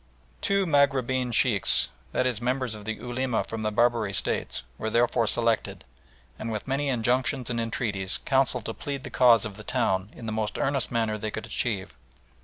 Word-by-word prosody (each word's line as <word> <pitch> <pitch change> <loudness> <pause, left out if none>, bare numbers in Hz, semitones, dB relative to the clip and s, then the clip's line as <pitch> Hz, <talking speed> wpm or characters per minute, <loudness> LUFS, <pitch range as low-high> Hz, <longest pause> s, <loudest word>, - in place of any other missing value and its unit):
Two 200 -1 +2
Maghribeen 130 -5 +2
Sheikhs 115 -3 +3 0.2
that 130 - +1
is 120 -3 -1
members 125 -1 -1
of 105 -1 -9
the 110 - -1
Ulema 125 -1 -1
from 115 -1 -6
the 110 - 0
Barbary 115 -2 +2
States 65 - -1 0.2
were 110 - -2
therefore 120 0 +2
selected, 115 0 0 0.5
and 115 - -4
with 105 - -4
many 140 +2 0
injunctions 125 +1 0
and 115 -1 -1
entreaties 105 -4 -1
counselled 130 -3 +2
to 115 - -3
plead 140 +1 -5
the - - -7
cause 120 -3 +5
of 105 -2 -7
the 105 - -9
town 95 -1 0
in 115 - -10
the 110 - -3
most 110 -1 -2
earnest 135 -1 0
manner 110 -2 0
they 110 - -3
could 110 - -5
achieve. 105 -6 -2
120 Hz, 185 wpm, -27 LUFS, 110-130 Hz, 0.5 s, cause